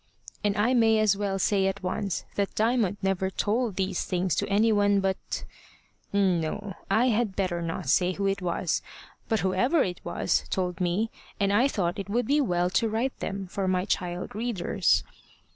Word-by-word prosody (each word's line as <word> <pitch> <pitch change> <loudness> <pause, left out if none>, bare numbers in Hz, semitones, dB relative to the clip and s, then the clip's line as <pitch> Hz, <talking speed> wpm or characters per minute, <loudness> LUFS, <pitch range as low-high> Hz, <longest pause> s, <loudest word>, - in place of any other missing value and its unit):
And 205 0 +1
I 225 +5 +3
may 225 -3 +4
as 215 -2 +3
well 200 -1 -1
say 195 0 +2
at 195 0 -3
once 195 +1 -2
that 200 -1 -2
Diamond 220 -3 +1
never 190 0 +1
told 215 +3 -1
these 190 0 -1
things 180 -2 -1
to - - -1
any 215 +3 +3
one 205 -1 +3
but 190 0 -2 0.7
no, 195 0 0 0.2
I 245 +3 +3
had 220 -3 0
better 180 -3 -1
not 165 -5 -4
say 180 +7 +3
who 200 +2 -3
it 195 0 0
was; 175 -1 -1 0.5
but 220 -3 +1
whoever 245 - +2
it 180 -2 -4
was - - 0
told 180 -1 -2
me, 185 +6 0 0.3
and 200 0 +2
I 240 +6 +4
thought 185 -8 -1
it 195 0 -5
would 240 +3 +1
be 290 +5 +3
well 180 -7 +1
to 220 +4 +2
write 230 +5 -2
them 195 -1 -4
for 190 +1 -3
my 185 0 +1
child 180 -3 -2
readers. 205 -5 +1
195 Hz, 180 wpm, -27 LUFS, 185-215 Hz, 0.7 s, may